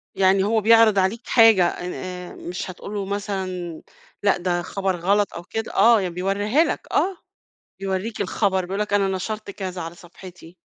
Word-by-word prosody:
يعني 190 0 +3
هو 220 +1 +1
بيعرض 225 -2 +5
عليك 205 +6 -1
حاجة 225 -7 +6
إن 180 +1 -4
آآ، 180 -1 -7
مش 180 +1 -6
هتقول 200 +3 -9
له 200 -2 -3
مثلًا 190 -4 -4 0.4
لأ 200 - +3
ده 175 -1 -1
خبر 190 0 -2
غلط 200 +3 +1
أو 170 - -7
كده؟ 225 +5 -5
آه 230 -2 +6
ي 185 - -2
بيورّيها 200 - +1
لك - - -3
آه، 380 -1 +1 0.6
بيورّيك 195 +3 -3
الخبر، 190 -1 0
بيقول 195 +3 -4
لك 210 -1 -2
أنا 200 -1 +3
نَشَرت 210 +3 -4
كذا 185 -3 -5
على 165 +1 -7
صفحتي. 175 0 -14
195 Hz, 175 wpm, -23 LUFS, 180-210 Hz, 0.6 s, حاجة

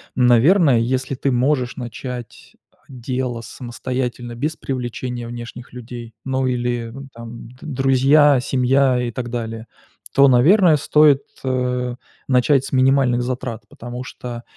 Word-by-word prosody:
наверное, 130 - +5
если 130 +3 -1
ты 135 +2 -1
можешь 125 0 +1
начать 125 0 -8 0.3
дело 125 -1 -4
самостоятельно 120 0 -5
без 150 +6 -2
привлечения 125 -2 -5
внешних 120 0 -9
людей, 120 -1 -9
ну 130 0 -1
или 120 -2 -2 0.2
там 115 0 -10
д 125 - -17
друзья, 135 +1 +4
семья 130 0 +2
и 120 -1 -2
так 120 +1 -5
далее, 115 -2 -4 0.5
то, 140 0 +6
наверное, 160 - +5
стоит, 150 -1 +4 0.2
э, 125 -1 -1 0.3
начать 130 +1 +3
с - - -7
минимальных 130 -2 +3
затрат. 125 -2 -4
Потому 120 +1 -8
что 120 -2 -8
125 Hz, 125 wpm, -20 LUFS, 120-135 Hz, 0.5 s, то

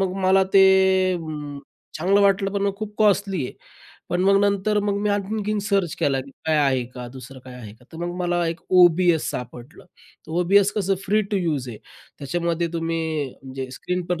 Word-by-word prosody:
मग 190 -1 0
मला 190 +1 +5
ते 195 - +7 0.5
अं, 150 -4 -6 0.4
चांगलं 190 +5 +3
वाटलं, 195 0 +2
पण 200 -1 -1
मग 200 -1 0
खूप 210 0 -7
कॉस्टली 200 -6 +2
आहे. - - -9 0.6
पण 175 - -1
मग 195 0 +5
नंतर 200 +1 +1
मग 200 -1 -1
मी 210 - 0
आणखीनं 210 +1 -2
सर्च 195 -5 0
केला, 135 -2 +1
की 135 +1 -11 0.2
काय 155 -1 +2
आहे 135 -4 +2
का? 125 -1 -7
दुसरं 130 0 -11
काय 130 -1 -11
आहे 115 -5 -10
का? 120 +2 -23
तर - - -9
मग 175 0 -4
मला 175 -1 0
एक 165 0 -5
O-B-S 175 -2 +4
सापडलं, 125 +5 -8 0.4
तर - - -8
O-B-S 200 +3 +4
कसं 195 -2 +1
फ्री 210 +2 +2
टू - - +2
यूज 155 -9 -2
आहे. 110 -3 -8 0.4
त्याच्यामध्ये 170 +4 -2
तुम्ही 165 0 -2 0.4
म्हणजे 130 -1 -7
स्क्रीन 180 0 -2
पण 180 -2 -2
175 Hz, 190 wpm, -23 LUFS, 145-200 Hz, 0.6 s, ते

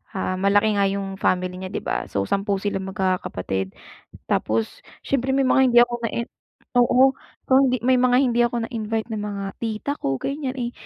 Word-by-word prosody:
ah, 185 -1 -2
malaki 205 +1 +3
nga 200 - +4
yung 195 0 -4
family 180 0 +1
niya, 190 - -5
'di - - -4
ba? - - -2
So, 100 - -1
10 200 - 0
silang 195 -2 -2
magkakapatid. 140 - -2 0.5
Tapos 110 0 -1 0.2
siyempre, 265 -1 0
may 270 -1 +2
mga 265 - +4
hindi 240 - +7
ako 240 0 +4
nain 235 +1 -2 0.5
oo, 250 +2 +5 0.4
so - - -12
hindi 255 -2 +2
may 255 0 +4
mga 250 0 +4
hindi 240 -2 +1
ako 235 -1 -3
na-invite 225 -1 -3
na 215 - -3
mga 205 -1 -4 0.2
tita 225 +4 -3
ko, 135 0 -1
ganiyan. 275 -2 -3
Eh, 240 -2 -3
215 Hz, 180 wpm, -23 LUFS, 190-245 Hz, 0.5 s, hindi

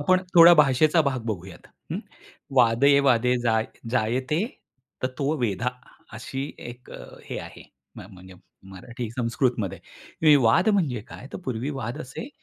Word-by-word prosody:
आपण 185 +5 +2
थोडा 170 0 +9
भाषेचा 150 +2 +4
भाग 135 -3 -1
बघूयात, 95 -4 -6 0.3
हं. - - -2 0.6
वादे, 125 +4 +5
वादे 125 -2 +2
जाय 110 -2 +1 0.2
जायते 130 +6 0 0.6
तत्व 130 +3 -1
वेधा, 115 +1 -1 0.5
अशी 135 +3 -5 0.3
1 120 +1 -14 0.3
हे - - -6
आहे, - - -11 0.3
म्ह - - -10
म्हणजे 95 0 -14 0.4
मराठी 115 +4 -7
संस्कृतमध्ये. 120 - -1 0.4
हे 155 -2 +7
वाद 115 - +4
म्हणजे 160 - +1
काय? - - -11
तर - - -5
पूर्वी 130 +2 -3
वाद 120 +5 -5
असे 140 - -8
125 Hz, 135 wpm, -24 LUFS, 115-140 Hz, 0.6 s, थोडा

